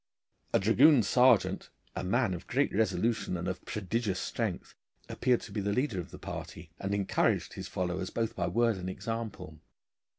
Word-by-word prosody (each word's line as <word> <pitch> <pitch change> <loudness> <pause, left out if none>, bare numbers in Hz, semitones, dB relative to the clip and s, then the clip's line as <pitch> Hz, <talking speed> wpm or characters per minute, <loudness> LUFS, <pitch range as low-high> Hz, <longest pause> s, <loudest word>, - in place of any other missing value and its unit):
A - - +4
dragoon 120 +6 +5
sergeant, 125 -1 +3 0.3
a - - -3
man 110 +2 +1
of 85 - -7
great 140 +3 +1
resolution 110 0 0
and 85 +2 -4
of 95 - -4
prodigious 105 -1 -2
strength, - - -3 0.3
appeared 125 -2 +1
to - - -10
be 105 - -2
the 100 +1 0
leader 125 -5 0
of 85 - -6
the - - -10
party, 80 - -8
and 100 +1 -1
encouraged 100 -2 +1
his - - -6
followers 90 +1 -2
both 115 -1 -2
by - - -1
word 115 -2 +2
and 90 0 -4
example. 105 -7 -5
105 Hz, 170 wpm, -30 LUFS, 95-120 Hz, 0.3 s, dragoon